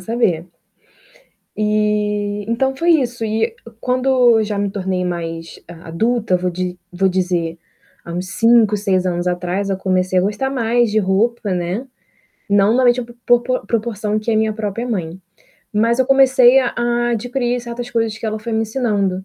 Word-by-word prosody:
saber. 180 -5 0 1.1
Eh, 210 -1 0
então, 265 +3 0
foi 340 +5 +1
isso. 240 -2 -3
E 225 +1 -1 0.3
quando 255 +1 0 0.3
eu 220 - +1
já 210 -1 -3
me 200 -1 -1
tornei 185 -2 -2
mais 165 -2 -5 0.2
adulta, 215 +3 0
vou 180 0 -2
di 180 0 -4
vou 190 +2 +1
dizer, 175 -3 -1 0.5
há 170 - -7
uns 180 +2 -4
5, 230 +1 +4
6 195 -3 0
anos 175 0 -1
atrás, 180 +2 -1
eu 195 - 0
comecei 185 -1 0
a - - +3
gostar 210 +7 -1
mais 240 -2 +1
de 215 - +2
roupa, 210 +2 0
né, 180 +8 -2 0.6
não 205 +2 +4
na 255 - +3
média 245 0 +3 0.2
por 240 0 +4
po 255 +1 -2
proporção 215 -2 -1
que 215 +2 -3
é 220 - +2
a - - +2
minha 220 0 +1
própria 220 +2 -4
mãe, 180 -5 -4 0.5
mas 230 +3 +2
eu 260 - +2
comecei 265 -2 +6
a 250 - 0
a 240 0 0
adquirir 245 +1 -1
certas 240 0 -6
coisas 225 -2 -1
que 225 - -5
ela 215 0 -2
foi 230 +1 -6
me 220 - +1
ensinando. 210 -5 -1
215 Hz, 175 wpm, -18 LUFS, 185-240 Hz, 1.1 s, comecei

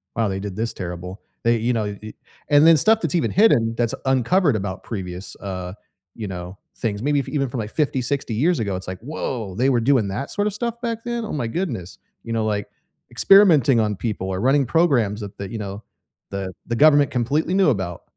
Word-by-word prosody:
wow, 115 -2 +1
they 95 0 -3
did 100 -1 -6
this 115 +2 -2
terrible. 90 +1 -7 0.2
They 115 0 +3
you 115 +3 0
know, 110 - 0 0.2
eh” 110 0 -8 0.4
And 145 +1 +6
then 165 -1 +7
stuff 220 +8 +4
that's - - -2
even 170 - +1
hidden 125 - +4
that's 115 -1 0
uncovered 135 - +2
about 95 -2 -4
previous, 95 -3 -6
uh, 90 -2 -5 0.4
you 110 -3 -5
know, 90 0 -7 0.2
things. 105 -2 -2
Maybe 145 +1 +2
f 135 - -4
even 140 -3 0
from, 120 - -4
like, 105 -1 -4
50, 140 -4 0
60 130 -1 -2
years 160 +10 +2
ago, 100 -4 -1
it's 95 - -7
like, 95 -1 -5
“Woah! 115 -7 -4
They 130 +3 +3
were 125 -3 +3
doing 125 -3 +3
that 110 +9 -4
sorta 205 0 0
stuff 235 +3 -4
back 230 -2 -3
then? 235 -1 -2
Oh - - -5
my 135 -6 -2
goodness.” 115 - -4 0.2
You 115 - -5
know, 115 -1 0
like, 105 -2 -1 0.4
experimenting 160 - +5
on 105 -2 +1
people 100 -3 -3
or 95 0 -2
running 135 +3 +3
programs 120 -8 +2
that 100 -1 -8
the 100 - -5
you 115 - -4
know, 100 +1 -6 0.5
the 95 -1 -4
the 120 - -2
government 145 +1 +5
completely 140 +8 0
knew 190 -3 +4
about, 95 - -2
115 Hz, 215 wpm, -22 LUFS, 100-145 Hz, 0.5 s, then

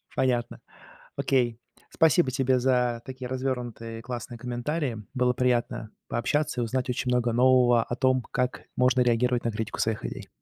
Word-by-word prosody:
Понятно. 120 -2 0 0.6
Окей. 120 -3 +1 0.3
Спасибо 160 -3 +3
тебе 130 0 +2
за 125 -2 +1
такие 130 -1 -6
развёрнутые 125 -3 -3
и - - -9
классные 120 0 -6
комментарии. 120 0 -3
Было 125 -1 +2
приятно 120 -3 0 0.2
пообщаться 125 +2 0
и - - +1
узнать 125 +3 -2
очень 125 0 -1
много 120 -1 +2
нового 125 -1 +5
о 120 - -4
том, 130 -1 +2
как 125 0 -1
можно 125 0 +3
реагировать 125 0 +2
на 115 - +1
критику 110 +1 -4
своих 110 -1 0
идей. - - -6
125 Hz, 155 wpm, -27 LUFS, 120-130 Hz, 0.6 s, нового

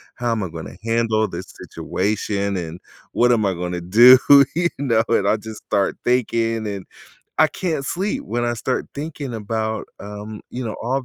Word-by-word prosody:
"How 120 -1 -1
am 115 - 0
I 90 - -4
gonna 80 +1 -8
handle 115 -1 +1
this - - -7 0.2
situation" 100 0 -2
and, 85 -1 -5 0.3
"What 120 0 +4
am 110 -3 +2
I 95 - +1
gonna 90 0 -4
do," 120 +9 +8 0.4
you 170 0 +2
know? 115 -5 +2
And 100 -4 +2
I 110 - +3
just 110 0 -9
start 100 -2 0
thinking 115 -2 +1
and 100 -2 -5 0.5
I 155 - +7
can't 160 -6 -3
sleep 195 +4 -2
when 120 +3 -2
I 120 - 0
start 125 +3 -2
thinking 145 -2 -5
about, 110 0 -3
um, 105 +1 -8
you 125 - -5
know, 110 - -4
all 130 +3 -1
110 Hz, 180 wpm, -21 LUFS, 100-125 Hz, 0.5 s, do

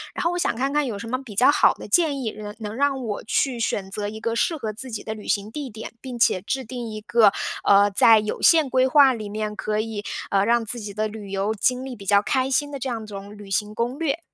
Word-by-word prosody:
然 - - -2
后 340 - +3
我 355 - -2
想 235 - 0
看 270 +4 -1
看 295 0 +2
有 210 -4 -4
什 230 - -7
么 255 +2 -2
比 215 -6 -11
较 255 +6 +6
好 300 - +4
的 - - -10
建 315 -6 +2
议， 220 -3 -2
能 210 0 -8
能 215 0 -6
让 275 -1 0
我 210 -3 -4
去 245 +2 0
选 195 -4 -2
择 205 0 -3
一 220 +1 -7
个 230 +1 -2
适 320 +7 +1
合 220 -5 -4
自 255 +4 -4
己 220 - -5
的 220 - -4
旅 215 - -11
行 205 +1 -1
地 285 -2 -5
点， 220 +1 -9
并 255 -2 -7
且 185 -5 +3
制 260 +6 -3
定 240 -1 -6
一 215 - -6
个， 220 -2 +4 0.3
呃， 200 0 +5
在 220 +3 +6
有 210 0 -4
限 320 -4 +5
规 260 0 +3
划 270 -1 +6
里 215 -3 -6
面 210 0 -4
可 215 0 -2
以， 215 -2 -4 0.3
呃， 195 0 +3
让 235 0 +2
自 240 +2 -3
己 205 -2 -7
的 215 0 0
旅 210 -2 -9
游 195 +2 -1
经 250 +5 0
历 255 -2 -6
比 200 - -12
较 200 -1 +5
开 260 0 0
心 290 +1 0
的 280 - -5
这 260 - -3
样 230 -2 -4
一 - - -9
种 200 0 -9
旅 205 -1 -11
行 210 +2 -1
攻 240 +4 -2
略。 320 0 -1
225 Hz, 295 characters per minute, -23 LUFS, 210-260 Hz, 0.3 s, 较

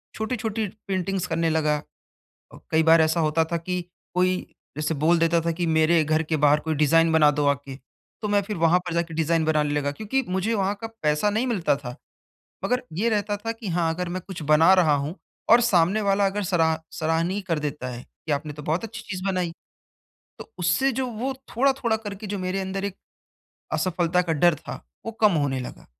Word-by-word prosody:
छोटी-छोटी 220 -1 -2 0.2
पेंटिंग्स 190 -1 -1
करने 165 -1 0
लगा 155 -1 +1 0.8
अ, - - -11
कई 160 0 +3
बार 165 +1 +6
ऐसा 160 +2 +1
होता 160 +1 +2
था - - +2
की 180 +2 -3 0.3
कोई 185 0 +2 0.4
जैसे 155 +1 -1
बोल 160 +4 +3
देता 165 0 +3
था 170 - +2
की 170 +1 -2
मेरे 160 +1 +3
घर 155 +1 +1
के 160 0 -1
बाहर 145 +1 +5
कोई 160 -1 -2
डिज़ाइन 165 +2 +3
बना 155 -2 +6
दो 145 0 0
आके। 140 -1 -1 0.5
तो 210 - -1
मैं 205 0 +2
फिर 210 +1 -5
वहाँ 165 +1 +4
पर 175 - -3
जा 170 - +2
के 165 -1 -10
डिज़ाइन 165 0 +1
बनाने 150 -2 +1
लगा 145 -1 0
क्योंकि 220 - -1
मुझे 190 +5 0
वहाँ 200 -1 0
का 225 - -4 0.2
पैसा 150 +6 +2
नहीं 220 +5 0
मिलता 195 - +1
था, 125 -3 -8 0.7
मगर 250 0 +1
ये 200 +9 0
रहता 205 -1 0
था 225 +3 -4
की 225 -2 -8
हाँ, 170 -2 +1
अगर 180 +1 -3
मैं 180 +1 -4
कुछ 190 -4 -7
बना 155 +4 +5
रहा 170 -5 +4
हूँ 145 +4 -3 0.4
और 235 +2 +8
सामने 195 -3 +3
वाला 200 0 +2
अगर 200 +2 -1
सरा 165 -3 +1
सराहनीय 165 +5 0
कर 165 -2 +1
देता 150 -3 -4
है, 125 -1 -7
कि 155 - -7
आपने 145 +1 -2
तो 150 +1 -9
बहुत 160 +7 -1
अच्छी 225 0 -7
चीज़ 185 -2 -4
बनाई। 180 -3 -1 0.9
तो - - -11
उससे 180 +10 +2
जो 260 +1 -1
वो 245 +3 -3 0.2
थोड़ा-थोड़ा 260 -3 +2
करके 210 -1 -7
जो 205 0 -3
मेरे 185 +1 -2
अंदर 190 +1 -3
एक 200 -1 -4 0.8
असफलता 180 -1 +1
का 170 -2 -1
डर 170 +2 +4
था, 125 - -8 0.3
वो 225 - -3
कम 215 -2 +5
होने 140 -5 0
लगा 125 - -9
170 Hz, 210 wpm, -24 LUFS, 155-200 Hz, 0.9 s, और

